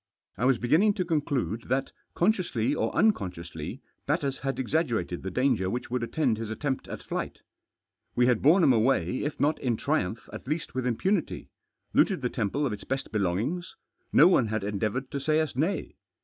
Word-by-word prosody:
I 120 - -1
Was 130 -2 +4
beginning 160 - +3
to 185 - -1
conclude 140 - -1
that, 135 +2 0 0.2
consciously 170 - +1
or - - 0
unconsciously, 90 - -1 0.2
Batters 140 -2 0
had 135 0 -3
ex 130 - -3
aggerated 115 - 0
the 95 - -4
dahgef* 125 -4 +1
which 120 +3 -4
would 125 -1 0
attend 120 -2 0
his 115 -1 -4
atfeiftjat 130 +4 -3
at - - -6
flight. - - -4 0.7
We 125 - +4
had 125 -3 +3
borne 170 +6 +5
him 135 -5 +6
away 120 -2 +2
if 145 +1 -3
not 150 +2 +2
in 120 -4 0
triumph* 115 -7 -1
at - - -8
least 155 +3 -3
With 130 -1 -1
impunity; 175 - -1 0.4
looted - - +3
the - - +1
temple 125 +8 -1
of 125 - -1
its 105 - -7
test 135 +1 -3
belongings 110 - -1 0.2
j - - -44
no 165 - +8
one 135 -11 +4
had 110 -1 -2
ertdeavouted 105 +6 -2
to 140 - -2
s&y 155 +3 +1
Us 155 -2 0
hay. 160 +10 -2
130 Hz, 190 wpm, -28 LUFS, 110-150 Hz, 0.7 s, no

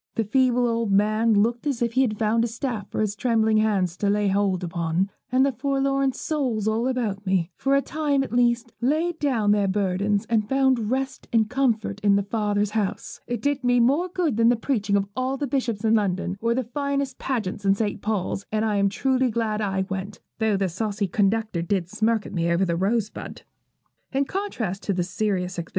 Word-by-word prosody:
The 225 - +1
feeble 245 +2 +2
old 230 -2 0
man 215 +3 +3
looked 235 +6 +1
as 275 -5 -1
if 235 -1 0
he 260 - +3
had 220 -5 0
found 225 +2 +2
a - - +1
staff 230 -3 -4
for - - -2
his 210 -1 -1
trembling 220 -2 +2
hands 200 -5 +1
to 205 - 0
lay 205 0 +2
hold 195 -2 +1
upon, 170 +2 -1 0.2
and 260 +1 +4
the 275 - +2
forlorn 275 +1 0
souls 255 -8 -2
all 225 +3 +1
about 225 -6 -2
me, 185 -3 0
for 275 0 +1
a 275 - +2
time 290 -3 0
at 265 - -7
least, 240 -1 +2
laid 320 +6 0
down 235 -8 +1
their 205 -1 +2
burdens 200 +1 0
and 220 -2 0
found 265 -5 +2
rest 260 +1 -2
and 220 -1 +2
comfort 230 -6 0
in 205 -1 +3
their 200 -1 +1
Father's 205 -1 0
house. 210 -3 -3
It 240 -3 -3
did 285 -2 0
me 245 0 +3
more 285 +10 +2
good 335 - -1
than 230 0 +5
the 245 - +4
preaching 215 -4 0
of 200 -1 +2
all 255 +2 -1
the 285 - -2
bishops 240 -5 -2
in 220 - +3
London, 190 -3 0
or 230 +1 +1
the 260 - 0
finest 280 +2 -2
pageant 220 -7 -3
at 195 0 +3
St. 210 -2 -2
Paul's; 205 -2 -2
and 215 +1 0
I 210 -2 +1
am 200 0 +3
truly 260 +4 +1
glad 220 -2 -1
I 195 -2 -1
went, 195 +1 -5 0.2
though 220 -2 +2
the 195 -1 0
saucy 205 +3 -2
conductor 205 -1 0
did 175 0 -1
smirk 220 +1 0
at - - -8
me 170 -2 0
over 175 +3 +2
the 170 -2 0
rosebud.' 210 +4 -2
220 Hz, 195 wpm, -24 LUFS, 200-255 Hz, 0.2 s, than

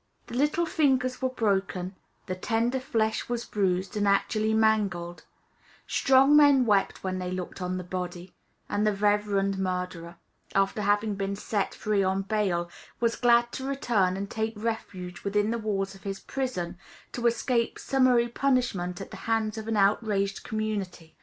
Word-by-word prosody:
The - - -11
little 295 +6 +1
fingers 265 -6 +1
were 260 - +1
broken; 195 -5 -1 0.3
the 185 - -3
tender 230 +6 0
flesh 220 -4 -1
was 240 -1 -2
bruised 190 -2 -1
and 205 -1 +1
actually 215 +2 +2
mangled; 200 -6 +1 0.6
strong 270 +2 +4
men 285 -3 +6
wept 205 -3 +1
when 185 -1 -2
they 180 0 -3
looked 185 +1 -5
on 180 0 -2
the 180 - -4
body; 180 0 -5 0.3
and 210 +1 0
the 210 - +3
reverend 200 -1 +1
murderer, 180 -2 -3 0.4
after 195 +2 +2
having 205 +1 +1
been 195 0 -2
set 205 0 -2
free 210 -2 0
on 190 0 +1
bail, 195 -4 0 0.3
was 235 -1 +1
glad 240 -1 +4
to 265 - -5
return 220 -9 +1
and 200 0 -5
take 220 0 -2
refuge 205 -5 -5
within 205 +2 +1
the 235 - -1
walls 195 -3 -2
of 195 - -15
his 195 +1 -5
prison, 185 -10 -4 0.3
to 240 -1 0
escape 235 0 0
summary 255 -3 +3
punishment 235 -9 0
at - - -8
the - - -8
hands 220 -1 +1
of 220 0 -6
an 225 -1 0
outraged 200 -1 +1
community. 200 -7 -4
210 Hz, 160 wpm, -27 LUFS, 190-235 Hz, 0.6 s, men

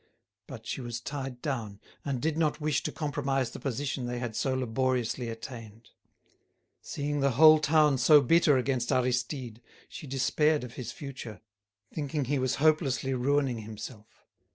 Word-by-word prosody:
But - - -10
she - - -4
was 120 -1 -5
tied 135 -3 -6
down, 110 -8 -3 0.2
and 135 -3 -2
did 155 +3 -1
not 155 -1 0
wish 150 -2 0
to - - -3
compromise 140 -5 -1
the - - -8
position 135 -1 -3
they 125 0 -3
had 120 -3 -4
so 130 +2 0
laboriously 125 -1 -1
attained. 115 -1 -9 0.9
Seeing 145 0 -3
the 140 -2 +2
whole 155 0 +8
town 150 -2 +3
so 150 +4 +7
bitter 145 +1 +4
against 125 -1 -1
Aristide, 125 -1 -1 0.3
she 150 - -9
despaired 135 +3 +1
of 120 -2 -8
his 125 - -6
future, 130 - -8 0.5
thinking 145 -1 -2
he 140 +2 0
was 130 -1 0
hopelessly 145 -3 +2
ruining 130 -1 +1
himself. 110 +1 -10
130 Hz, 155 wpm, -29 LUFS, 120-145 Hz, 0.9 s, whole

